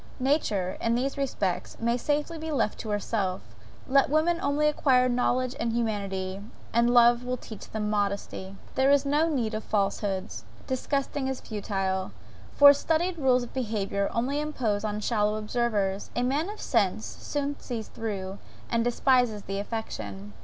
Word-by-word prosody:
Nature, 220 Hz, -, 0 dB
in 230 Hz, 0 st, +2 dB
these 265 Hz, +3 st, -1 dB
respects, 225 Hz, -10 st, -2 dB
may 235 Hz, +1 st, +1 dB
safely 295 Hz, +5 st, -1 dB
be 320 Hz, +1 st, -5 dB
left 270 Hz, -7 st, 0 dB
to 220 Hz, -, -5 dB
herself; 200 Hz, -2 st, -1 dB, 0.5 s
let 275 Hz, 0 st, +4 dB
women 320 Hz, +3 st, +2 dB
only 290 Hz, +2 st, +2 dB
acquire 260 Hz, -4 st, +3 dB
knowledge 250 Hz, +1 st, +1 dB
and 230 Hz, 0 st, 0 dB
humanity, 200 Hz, -4 st, -2 dB, 0.3 s
and 235 Hz, +1 st, +4 dB
love 240 Hz, 0 st, +6 dB
will 250 Hz, 0 st, -2 dB
teach 220 Hz, -4 st, -10 dB
them 215 Hz, -1 st, -2 dB
modesty. 200 Hz, -2 st, -2 dB, 0.2 s
There 265 Hz, +1 st, +3 dB
is 280 Hz, 0 st, +4 dB
no 300 Hz, +4 st, +2 dB
need 240 Hz, -8 st, -1 dB
of 215 Hz, 0 st, -3 dB
falsehoods, 195 Hz, -, -1 dB, 0.2 s
disgusting 270 Hz, +1 st, -1 dB
as 265 Hz, -, -3 dB
futile, 195 Hz, -3 st, -2 dB, 0.4 s
for 285 Hz, 0 st, +9 dB
studied 330 Hz, +4 st, 0 dB
rules 255 Hz, -3 st, +3 dB
of 240 Hz, -, -9 dB
behaviour 205 Hz, -5 st, -1 dB
only 270 Hz, +5 st, 0 dB
impose 235 Hz, -9 st, -1 dB
on 210 Hz, 0 st, -2 dB
shallow 210 Hz, -1 st, +1 dB
observers; 210 Hz, -3 st, -1 dB
a 245 Hz, -, +1 dB
man 285 Hz, +8 st, 0 dB
of 425 Hz, -, -7 dB
sense 190 Hz, -, +1 dB
soon 285 Hz, -, -4 dB
sees 230 Hz, -4 st, -5 dB
through, 200 Hz, -3 st, -5 dB, 0.3 s
and 230 Hz, -1 st, +2 dB
despises 245 Hz, -3 st, +2 dB
the 195 Hz, 0 st, -3 dB
affectation. 105 Hz, -, -5 dB
235 Hz, 155 wpm, -27 LUFS, 205-270 Hz, 0.5 s, for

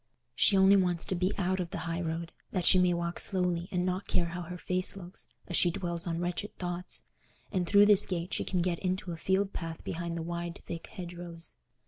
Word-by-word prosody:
She 195 Hz, -, +4 dB
only 190 Hz, +1 st, +7 dB
wants 180 Hz, -3 st, +3 dB
to -, -, +2 dB
be 185 Hz, +2 st, +1 dB
out 185 Hz, -1 st, 0 dB
of 175 Hz, -2 st, -2 dB
the -, -, -5 dB
high 170 Hz, +1 st, -2 dB
road, 165 Hz, 0 st, -3 dB, 0.2 s
that 180 Hz, -3 st, -2 dB
she 185 Hz, -, +7 dB
may 180 Hz, -1 st, +4 dB
walk 170 Hz, 0 st, -2 dB
slowly 180 Hz, -2 st, +1 dB
and 180 Hz, -1 st, 0 dB
not 185 Hz, +1 st, -2 dB
care 170 Hz, -1 st, +1 dB
how 175 Hz, +1 st, -5 dB
her 180 Hz, +1 st, -6 dB
face 185 Hz, +2 st, +1 dB
looks, 180 Hz, 0 st, -7 dB, 0.2 s
as 175 Hz, -, -3 dB
she 175 Hz, -, +5 dB
dwells 175 Hz, -1 st, -2 dB
on 165 Hz, -1 st, -1 dB
wretched 175 Hz, +4 st, -3 dB
thoughts; 175 Hz, 0 st, -3 dB, 0.5 s
and 180 Hz, -2 st, 0 dB
through 205 Hz, +2 st, +7 dB
this 205 Hz, -1 st, +7 dB
gate 175 Hz, -1 st, -3 dB
she -, -, 0 dB
can 180 Hz, -2 st, 0 dB
get 175 Hz, -2 st, 0 dB
into 185 Hz, -1 st, -2 dB
a -, -, -3 dB
field 190 Hz, +4 st, 0 dB
path 165 Hz, -1 st, -5 dB
behind 170 Hz, 0 st, -3 dB
the 165 Hz, -, -3 dB
wide 170 Hz, 0 st, -5 dB
thick 165 Hz, -1 st, -6 dB
hedgerows. 175 Hz, -2 st, -7 dB
175 Hz, 220 wpm, -30 LUFS, 170-185 Hz, 0.5 s, only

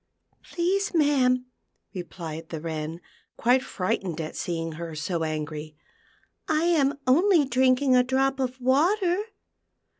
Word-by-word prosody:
" -, -, -43 dB
Please, 375 Hz, +3 st, 0 dB
ma'am," 260 Hz, -5 st, +3 dB, 0.5 s
replied 165 Hz, -3 st, -7 dB
the 160 Hz, -, -5 dB
Wren, 160 Hz, +1 st, -5 dB, 0.4 s
quite 250 Hz, +3 st, +3 dB
frightened 185 Hz, -6 st, -3 dB
at 155 Hz, -1 st, -5 dB
seeing 165 Hz, -1 st, -3 dB
her 165 Hz, 0 st, -7 dB
so 165 Hz, +2 st, -2 dB
angry, 155 Hz, -1 st, -4 dB, 0.4 s
" -, -, -36 dB, 0.2 s
I 310 Hz, 0 st, +1 dB
am 290 Hz, -5 st, +2 dB
only 330 Hz, +4 st, +4 dB
drinking 260 Hz, +1 st, +3 dB
a 250 Hz, -, +6 dB
drop 265 Hz, +1 st, +1 dB
ot 260 Hz, 0 st, -2 dB
water." 345 Hz, -, +2 dB
250 Hz, 130 wpm, -26 LUFS, -, 0.5 s, a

